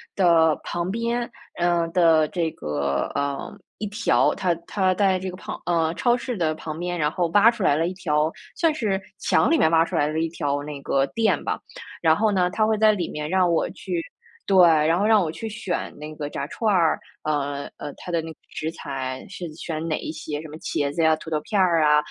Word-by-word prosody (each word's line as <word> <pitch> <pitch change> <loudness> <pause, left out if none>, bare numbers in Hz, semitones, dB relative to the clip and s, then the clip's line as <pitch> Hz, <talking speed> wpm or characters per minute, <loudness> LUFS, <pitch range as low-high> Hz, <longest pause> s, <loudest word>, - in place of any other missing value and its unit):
的 165 -4 +4
旁 175 +1 -3
边， 235 +2 -1 0.3
呃， 175 -1 +2
的 165 -3 +4
这 170 -3 -1
个， 70 -2 -2
呃， 140 +3 -3 0.2
一 215 - -4
条 215 +3 +2
它 180 -3 0
它 190 -3 +1
在 190 -2 +2
这 185 0 -4
个 180 - -8
旁 - - -7
呃， 165 -1 +1
超 240 +6 +2
市 250 0 -4
的 160 -5 0
旁 155 0 -6
边， 175 0 -2
然 150 -2 +1
后 175 +1 0
挖 205 +7 +6
出 230 - -8
来 145 - +4
了 165 +3 +1
一 185 - -3
条 155 -4 0 0.2
算 330 -2 +2
是 210 -9 -1 0.2
墙 295 - +2
里 330 - +5
面 - - +4
挖 165 0 +4
出 - - -5
来 145 - +2
了 155 +1 -2
一 165 - +1
条 145 -3 -2
那 145 -1 -7
个 135 0 +1
店 225 +6 0
吧。 - - -2 0.4
然 160 -1 +5
后 215 +2 +2
呢， 180 -2 +2
它 215 +3 +1
会 220 - +2
在 215 0 +5
里 185 -5 -2
面 150 0 -4
让 185 -2 +3
我 165 - +1
去 175 -3 -4 0.5
对， 195 -1 +3 0.3
然 165 +2 +3
后 205 - +2
让 220 -2 +5
我 155 - -2
去 225 +6 -6
选 195 -4 -3
那 150 +1 -7
个 145 -1 -4
炸 140 - -4
串 220 +7 -1
儿， 170 -3 +3 0.2
呃 145 -2 -2
呃， 145 - -6
它 180 - -7
的 170 -1 +1
那 160 0 -7
个 - - -14
食 160 +1 -4
材 130 -4 -5
是 180 -4 -7
选 160 0 -4
哪 155 - 0
一 - - -5
些， 155 -1 -5
什 - - -8
么 150 - -9
茄 145 -3 -2
子 165 - -1
呀、 160 0 +5
土 160 +1 -10
豆 150 - 0
片 205 +3 -1
儿 170 -4 +4
啊， 150 0 +5
165 Hz, 245 characters per minute, -24 LUFS, 155-190 Hz, 0.5 s, 挖